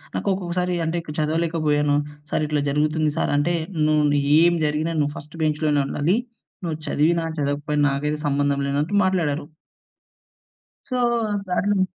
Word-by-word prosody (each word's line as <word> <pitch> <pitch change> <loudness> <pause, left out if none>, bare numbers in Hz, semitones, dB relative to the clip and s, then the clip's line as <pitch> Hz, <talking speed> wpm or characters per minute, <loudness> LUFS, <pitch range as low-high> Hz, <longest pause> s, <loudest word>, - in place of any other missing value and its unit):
నాకు - - -3
ఒక్కొక్కసారి 180 -1 -1
అంటే, 160 +2 -1
ఇప్పుడు 150 -2 -8
చదవలేకపోయాను. 155 -2 +1 0.4
సార్ - - +1
ఇట్లా 150 -1 0
జరుగుతుంది 150 +2 +1
సార్ - - 0
అంటే, 170 +4 +1 0.3
"నువ్వు 155 -1 +3
నీ 145 - +3 0.2
ఏం 175 0 +5
జరిగినా 155 +2 0
నువ్వు 145 0 0
ఫస్ట్ 155 0 -11
బెంచ్‌లోనే 150 -1 +1
ఉండాలి. 165 +10 +1 0.5
నువ్వు 160 -2 -2
చదివినా, 165 +3 +2
చదవకపోయినా, 145 +1 0
నాకైతే 150 +2 -2
సంబంధం 140 0 +1
లేనట్టు" 145 +8 -1
మాట్లాడారు. 160 -6 0 1.4
సో, 255 - -2 0.5
దారుణం 190 +2 +1
155 Hz, 135 wpm, -23 LUFS, 145-170 Hz, 1.4 s, ఏం